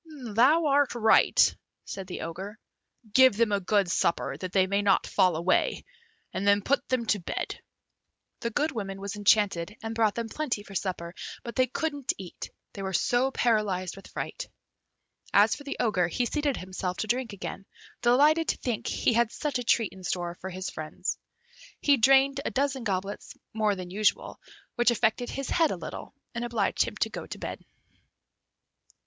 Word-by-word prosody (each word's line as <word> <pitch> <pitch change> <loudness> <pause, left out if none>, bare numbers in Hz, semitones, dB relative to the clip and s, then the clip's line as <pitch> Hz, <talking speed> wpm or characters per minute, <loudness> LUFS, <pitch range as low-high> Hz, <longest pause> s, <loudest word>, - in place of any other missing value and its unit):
"Thou 285 +9 +5
art 285 -3 +3
right," 225 -2 +5 0.3
said 195 -2 -6
the 180 - -6
Ogre; 190 +6 -6 0.6
"give 260 -5 +6
them 230 -2 +2
a 200 - +2
good 200 0 +2
supper, 135 -6 0
that 180 +5 -6
they 190 -1 +4
may 200 +2 +1
not 200 -1 +3
fall 180 -3 +2
away, 170 +3 +1 0.5
and 200 - -2
then 200 0 +4
put 280 +6 +1
them 255 -3 0
to 210 -2 +1
bed." 175 - -4 0.8
The 235 - -2
good 300 +7 0
woman 195 -5 -5
was 200 +1 -5
enchanted, 205 -2 +2
and 225 0 -3
brought 220 -2 +2
them 235 -1 -3
plenty 240 -4 -3
for 195 - -12
supper, 175 -3 -3 0.3
but 235 - -7
they 255 0 +3
couldn't 290 +1 -2
eat, 185 -3 -8 0.2
they 200 - -7
were 190 0 -3
so 245 +9 +2
paralysed 210 -8 0
with 195 - -12
fright. - - -6 0.9
As - - +6
for 290 - -11
the 280 - -4
Ogre, 185 -7 +2
he 245 +8 -1
seated 290 +1 -1
himself 185 0 -4
to 220 - -2
drink 245 +1 -1
again, 195 0 -7 0.3
delighted 295 +7 +4
to - - 0
think 240 -4 -3
he - - +1
had 235 0 +2
such 290 -4 -2
a - - -3
treat 230 -2 +2
in 190 -1 -13
store 175 -1 -2
for 190 - -5
his 185 +1 -5
friends. 160 +4 -4 0.6
He 285 -1 +4
drained 270 +3 +4
a - - -1
dozen 275 -1 -1
goblets 195 -1 -3 0.2
more 215 -2 +1
than 180 -1 -7
usual, 210 +2 0 0.4
which 240 0 +4
affected 240 +1 +1
his 275 -1 -4
head 325 -2 +3
a - - -3
little, - - -8 0.2
and 235 0 -3
obliged 235 -4 +1
him - - -7
to - - +2
go - - -6
to - - -7
bed. - - -6
215 Hz, 180 wpm, -28 LUFS, 190-255 Hz, 0.9 s, give